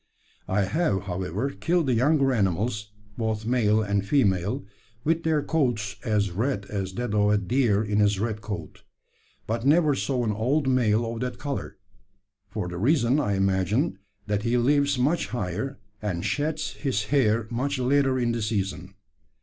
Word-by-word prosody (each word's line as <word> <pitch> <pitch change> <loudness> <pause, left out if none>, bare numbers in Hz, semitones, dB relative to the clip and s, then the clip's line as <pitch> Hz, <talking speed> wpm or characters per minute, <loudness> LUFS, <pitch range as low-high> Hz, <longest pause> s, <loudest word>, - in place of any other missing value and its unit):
I 100 +2 +1
have, 125 - 0
however, 95 - -2
killed 170 +2 0
the 130 - +2
younger 135 +2 +3
animals, 105 +1 0 0.3
both 110 -1 -1
male 110 -3 +2
and 100 -1 0
female, 100 -6 +1 0.4
with 165 +2 +1
their 160 -3 +1
coats 120 -10 0
as 105 -4 +1
red 105 +2 -1
as 95 -2 -3
that 120 0 -3
of 105 -1 +3
a 105 - +4
deer 110 0 +2
in 105 0 0
his 105 -1 +3
red 110 0 -2
coat; 95 -6 -6 0.6
but 115 +1 -2
never 150 +2 +4
saw 135 -2 -1
an 110 - 0
old 130 +7 0
male 120 -3 +2
of 115 0 -4
that 125 0 -3
colour, 140 -1 -5 0.7
for 100 -2 -3
the 90 0 -5
reason, 130 - +3
I 105 -9 0
imagine, 95 - +1 0.3
that 105 -1 -1
he 120 +2 +1
lives 140 +3 +2
much 150 +7 +1
higher, 120 +5 -3 0.2
and 95 -3 -2
sheds 150 +8 -1
his 130 -8 -2
hair 115 -5 +3
much 135 +4 -1
later 135 +1 +2
in 120 -2 +1
the 115 0 -2
season. 95 -3 -3
115 Hz, 165 wpm, -26 LUFS, 100-135 Hz, 0.7 s, a